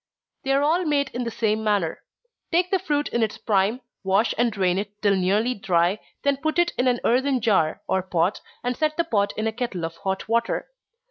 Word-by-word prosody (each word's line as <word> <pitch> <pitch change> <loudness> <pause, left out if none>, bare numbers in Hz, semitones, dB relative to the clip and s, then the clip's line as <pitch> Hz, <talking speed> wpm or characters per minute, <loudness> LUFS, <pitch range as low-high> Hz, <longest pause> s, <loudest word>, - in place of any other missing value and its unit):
_ - - -52
They 270 - -1
are 275 +1 +3
all 330 +5 +2
made 285 -3 +1
in 245 0 -3
the - - -1
same 220 -1 0
manner. 205 -6 0 0.5
Take 350 +2 +2
the 385 - +3
fruit 295 -2 0
in 235 - 0
its 220 -2 0
prime, 210 +4 +1 0.2
wash 195 +4 +2
and 240 0 +2
drain 190 -3 +1
it 205 0 -7
till 200 -1 +4
nearly 205 +6 +1
dry, 190 -1 +1 0.2
then 280 -1 +2
put 315 +3 -2
it 345 0 +3
in 255 - +1
an 245 -1 +2
earthen 260 +2 +2
jar, 200 -9 +1
or 190 - +1
pot, 180 +1 0 0.2
and 245 0 -1
set 305 +2 0
the 335 - +3
pot 205 -10 +1
in 215 - -1
a 225 - +1
kettle 220 -8 -3
of 165 0 -7
hot 190 +1 -3
water. 235 - 0
225 Hz, 220 wpm, -24 LUFS, 195-275 Hz, 0.5 s, till